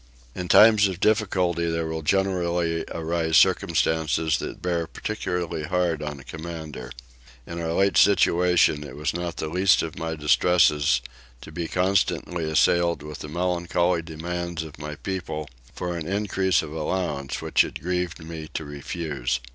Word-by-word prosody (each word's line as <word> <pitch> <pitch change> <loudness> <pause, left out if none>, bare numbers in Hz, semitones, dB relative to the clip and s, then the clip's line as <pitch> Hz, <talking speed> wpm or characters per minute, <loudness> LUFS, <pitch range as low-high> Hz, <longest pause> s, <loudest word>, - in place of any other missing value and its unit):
In 90 -1 -5
times 105 +1 +7
of 95 -2 -5
difficulty 95 -6 +1
there 80 0 -1
will 80 0 -3
generally 85 -1 0
arise 80 0 0
circumstances 80 -3 +2
that - - -6
bear 85 -2 -1
particularly 90 -6 -3
hard 85 0 0
on 75 -2 -5
a - - -12
commander. 80 -6 -7 0.6
In 85 0 -6
our 80 0 -2
late 95 -1 +2
situation 90 -6 +4
it 70 -3 -9
was 75 +1 -2
not 85 0 -4
the 80 - -3
least 90 +3 +3
of 80 -1 -6
my 80 0 -3
distresses 75 -3 +3 0.4
to - - -11
be 85 +1 -4
constantly 90 -2 0
assailed 85 0 +2
with 75 0 -8
the 75 - -7
melancholy 85 +1 0
demands 85 +1 -4
of 80 -2 -11
my 75 0 -6
people 80 -4 -4 0.3
for 90 -1 -3
an 80 -2 -5
increase 95 -3 +1
of 75 - -8
allowance 75 -4 -2
which - - +3
it - - -6
grieved 90 -1 -3
me 80 -1 -7
to 80 - -3
refuse. 70 -3 -3
85 Hz, 155 wpm, -25 LUFS, 80-90 Hz, 0.6 s, times